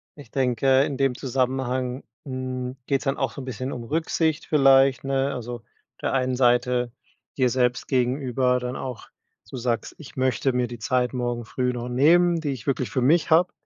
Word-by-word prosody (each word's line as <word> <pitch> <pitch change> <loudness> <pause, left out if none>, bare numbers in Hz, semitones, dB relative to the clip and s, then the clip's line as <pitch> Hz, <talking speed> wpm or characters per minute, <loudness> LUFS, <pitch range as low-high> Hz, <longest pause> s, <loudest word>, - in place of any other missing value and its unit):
ich 145 - -14
denke, 130 +1 +3
in 140 -2 -3
dem 135 -2 +2
Zusammenhang, 130 0 -1 0.2
hm, 130 -1 -4
geht's 135 -1 0
dann 135 - 0
auch 135 -3 -1
so 140 - -8
'n - - -8
bisschen 130 +1 -4
um 120 - -5
Rücksicht 160 +3 0
vielleicht, 135 -3 +5
ne? 135 0 0
Also, 120 0 -5
auf - - -22 0.4
der - - -1
einen 130 -1 +1
Seite 125 -1 +2 0.5
dir 130 -2 +3
selbst 125 -1 0
gegenüber 125 0 +1
dann 125 +1 -4
auch, 130 -4 -6 0.4
dass 105 - -23
du 130 - -5
sagst: 120 -2 -2
„Ich 155 - -12
möchte 130 0 +1
mir 125 -1 +1
die 120 -1 -8
Zeit 125 +2 0
morgen 120 -2 -2
früh 125 +2 -1
noch 120 0 -5
nehmen, 170 +7 +4
die 150 -3 -3
ich 125 -4 -7
wirklich 130 -2 0
für 130 - 0
mich 160 +6 +3
habe.“ 175 +3 +5
130 Hz, 195 wpm, -24 LUFS, 125-135 Hz, 0.5 s, vielleicht